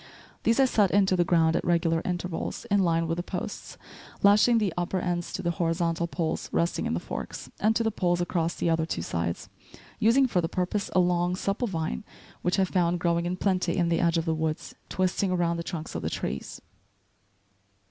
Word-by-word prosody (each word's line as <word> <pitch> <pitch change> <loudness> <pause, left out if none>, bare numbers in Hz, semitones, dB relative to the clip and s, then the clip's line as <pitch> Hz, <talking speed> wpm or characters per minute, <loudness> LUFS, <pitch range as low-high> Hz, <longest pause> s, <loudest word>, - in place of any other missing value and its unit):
These 230 +3 +2
I 270 - +6
set 210 -6 +3
into 195 0 +3
the 175 - +3
ground 165 -1 +3
at - - 0
regular 165 -1 +2
intervals, 180 +3 -3
in 200 - +4
line 165 -3 +2
with 165 +1 -1
the - - -1
posts, - - -6 0.5
lashing 210 +4 +6
the 210 -5 +1
upper 175 +2 -1
ends 175 -1 -2
to 190 - -4
the 170 - +1
horizontal 170 0 0
poles 165 -2 -2
resting 170 +1 0
in - - -1
the - - -1
forks, - - -6
and 220 +1 +2
to 230 - +2
the 225 - +1
poles 175 -4 0
across 170 -1 -1
the - - -1
other 165 -1 +1
two 85 - -3
sides, 85 0 -3 0.5
using 235 +5 +5
for 190 -8 +1
the 165 - -2
purpose 185 +3 -1
a - - +6
long, 175 0 +2
supple 200 +5 -1
vine 160 - -3 0.4
which 180 - 0
I 190 - +4
found 175 -2 +1
growing 170 0 +1
in 180 +1 -2
plenty 185 -2 0
in 170 -2 +2
the 165 -1 +2
edge 170 -1 +2
of 165 - 0
the 160 - +1
woods, 160 -1 -3 0.2
twisting 185 +1 0
around 175 -2 +1
the 170 - -3
trunks 165 -2 -5
of - - -3
the - - -2
trees. 70 - -4
175 Hz, 210 wpm, -27 LUFS, 165-190 Hz, 0.5 s, I